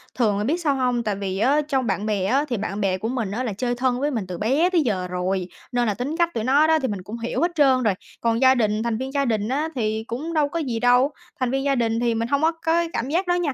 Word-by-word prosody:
Thường 215 -5 +2
là 205 - -1
biết 295 +9 +1
sao 290 -4 +1
hông? 250 -2 0
Tại 210 -2 -1
vì 195 -1 -3
á 275 +7 +3
trong 265 -5 0
bạn 200 +1 -1
bè 205 -3 0
á 270 +8 +2
thì 240 - -1
bạn 200 0 -3
bè 190 -1 +1
của 215 - -3
mình 230 -6 -2
á 245 +5 -2
là 225 - -2
chơi 245 +4 -2
thân 250 0 0
với 295 +2 0
mình 220 -7 -3
từ 180 -1 -5
bé 275 - +2
tới 355 -3 +2
giờ 190 -8 -1
rồi, 180 0 -2 0.2
nên 245 -2 +1
là 210 - +1
tính 280 - -4
cách 340 0 +1
tụi 225 - -2
nó 285 +5 +4
đó 320 0 +4
thì 260 - -1
mình 200 -3 -4
cũng 220 +5 -7
hiểu 230 +1 -2
hết 345 +1 +2
trơn 265 -4 +4
rồi. 210 -4 +3 0.3
Còn 230 0 +1
gia 260 0 +6
đình 215 -2 +1
thành 235 -2 -1
viên 265 +2 -4
gia 280 -1 +1
đình 215 -4 0
á 295 +4 -1
thì 220 -2 -1
cũng 295 +9 -4
đâu 300 -3 +2
có 335 - -3
gì 245 -7 -2
đâu, 250 +4 +4 0.3
thành 255 -2 0
viên 270 0 0
gia 280 -1 +2
đình 230 -2 0
thì 235 -1 +1
mình 230 +1 -1
hông 280 +3 +1
có 320 +1 +4
có 330 - -21
cái 340 0 +1
cảm 250 - -2
giác 355 +5 0
đó 355 - +2
nha, 340 -6 0
245 Hz, 310 wpm, -23 LUFS, 215-280 Hz, 0.3 s, gia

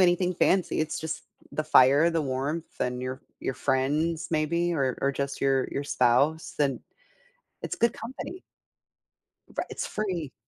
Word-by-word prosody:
anything 180 0 +4
fancy, 185 0 +2
it's 155 0 -1
just 160 0 -4 0.3
the 155 - -1
fire, 145 +2 +6
the 165 -1 0
warmth, 140 +5 -3
and 125 0 -1
your 130 +1 -4 0.2
your 130 - -2
friends 150 +6 0
maybe, 170 +2 +1
or 135 -6 0
or 140 - +2
just 140 0 -3
your 135 -1 +2
your 140 - -3
spouse, 140 +5 +2
and 140 -3 +1 0.8
it's - - -3
good 235 0 +3
company. 265 +10 -7 1.1
Right, - - -2
it's - - -3
free. 180 -9 -3
155 Hz, 150 wpm, -27 LUFS, 135-170 Hz, 1.1 s, fire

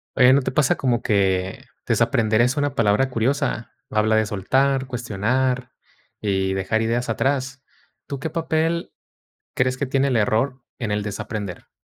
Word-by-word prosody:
Oye, 125 0 +6
¿no 140 - +4
te 130 - -2
pasa 135 0 +3
como 125 -3 0
que 95 -2 0 0.2
desaprender 110 0 +2
es 125 +4 +2
una 145 -2 0
palabra 115 +4 +2
curiosa? 125 0 -1 0.2
Habla 110 +1 +2
de 110 0 +3
soltar, 130 +6 +1
cuestionar 125 +2 -1 0.5
y 95 -2 0
dejar 95 +4 0
ideas 115 +2 -1
atrás. 135 +3 -1 0.5
¿Tú 140 - -5
qué 160 - -3
papel 165 0 -1 0.6
crees 125 0 +1
que 140 - -1
tiene 135 +1 +1
el 130 - 0
error 115 +4 +1 0.2
en 115 -3 -2
el 105 0 0
desaprender? 105 -3 -5
120 Hz, 150 wpm, -22 LUFS, 105-135 Hz, 0.6 s, Oye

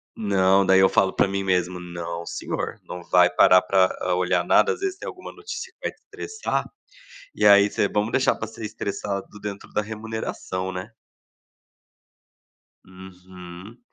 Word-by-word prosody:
Não, 100 -2 +3
daí 95 0 +5
eu 95 - +6
falo 95 -1 +2
para - - +2
mim 100 0 -2
mesmo: 90 -1 0
"Não 85 -1 -6
senhor, - - -4
não 90 -1 -7
vai 90 -1 +5
parar 90 +1 +6
pra 95 0 +3 0.3
olhar 90 0 +1
nada". - - +4
Às - - -4
vezes, 390 -1 -2
tem - - -7
alguma 370 -2 -8
notícia 415 +2 -8
que - - -81
vai - - -2
te - - -26
estressar, 440 +2 -4 0.7
e - - -1
aí 100 0 +7
você 100 - 0
vamos 105 +3 -1
deixar 130 - +2
pra 110 - -5
ser 110 0 -10
estressado 100 -1 -4 0.2
dentro 100 -1 -6
da 105 - 0
remuneração, 110 -3 -5
né? 95 +4 -7 1.9
Uhum. 95 +2 -12
95 Hz, 160 wpm, -24 LUFS, 90-105 Hz, 1.9 s, aí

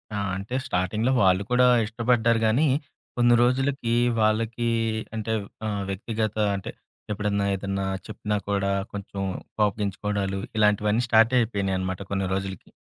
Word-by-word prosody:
ఆ! - - -1 0.2
అంటే 100 +6 -5
స్టార్టింగ్‌లో 105 +7 0
వాళ్ళు 95 +1 +4
కూడా 125 0 +5 0.2
ఇష్టపడ్డారు 115 0 +2
గానీ, 135 +8 +3 0.5
కొన్ని 120 0 +5
రోజులకి 130 -1 +1 0.3
వాళ్ళకి 115 +2 +1 0.5
అంటే 110 0 -2 0.3
ఆహ్, 100 -1 -2
వ్యక్తిగత 110 +2 -2 0.2
అంటే 95 - -5 0.4
ఎప్పుడన్నా 105 -1 0
ఏదన్నా 95 0 -3 0.2
చెప్పినా 105 -1 -2
కూడా, 100 -1 +1 0.2
కొంచెం 100 -1 -6 0.4
కోపగించుకోవడాలు 100 -1 -1 0.2
ఇలాంటివన్నీ 105 +2 +3
స్టార్ట్ 115 +2 +5
అయిపోయినాయన్నమాట 95 -4 -1
కొన్ని 95 -1 0
రోజులకి. 95 -1 -5
105 Hz, 115 wpm, -25 LUFS, 100-115 Hz, 0.5 s, కూడా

